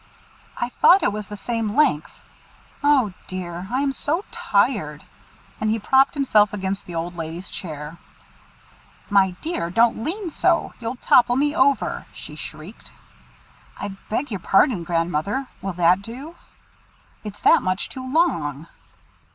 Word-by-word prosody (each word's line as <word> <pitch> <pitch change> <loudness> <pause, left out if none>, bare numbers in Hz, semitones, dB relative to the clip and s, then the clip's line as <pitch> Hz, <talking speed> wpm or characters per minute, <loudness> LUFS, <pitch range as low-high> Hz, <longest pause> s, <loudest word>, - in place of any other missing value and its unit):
"I 240 - -2
thought 365 +9 +5
it 205 - +2
was 210 -2 -6
the 210 - -7
same 225 -1 -2
length. 275 - +1 0.6
Oh, 270 -9 +3
dear! 180 -1 -6
I 255 +2 +1
am 280 - +1
so 320 +7 -2
tired;" - - 0 0.6
and 215 - 0
he 220 - +1
propped 265 +7 +3
himself 215 -8 +3
against 195 0 -3
the 175 - -7
old 170 +2 -3
lady's 165 +2 -6
chair. 155 -1 -7 1.1
"My 190 -2 +4
dear! 315 - -2
don't 225 +4 +2
lean 355 - -3
so; - - +1
you'll 230 +1 -4
tipple 245 0 +4
me 290 +3 +1
over!" 275 -2 +1
she - - -9
shrieked. - - -9 0.9
"I 205 - -4 0.2
beg 250 +4 -2
your 200 - -3
pardon, 195 +1 +3
Grandmother. 170 - -1 0.2
Will 195 -1 -3
that 175 +2 +3
do?" 260 +10 -8 0.9
"It's 210 -1 -8
that - - +5
much 185 +1 -1
too 260 0 -7
long." 165 - +1
210 Hz, 145 wpm, -22 LUFS, 180-265 Hz, 1.1 s, thought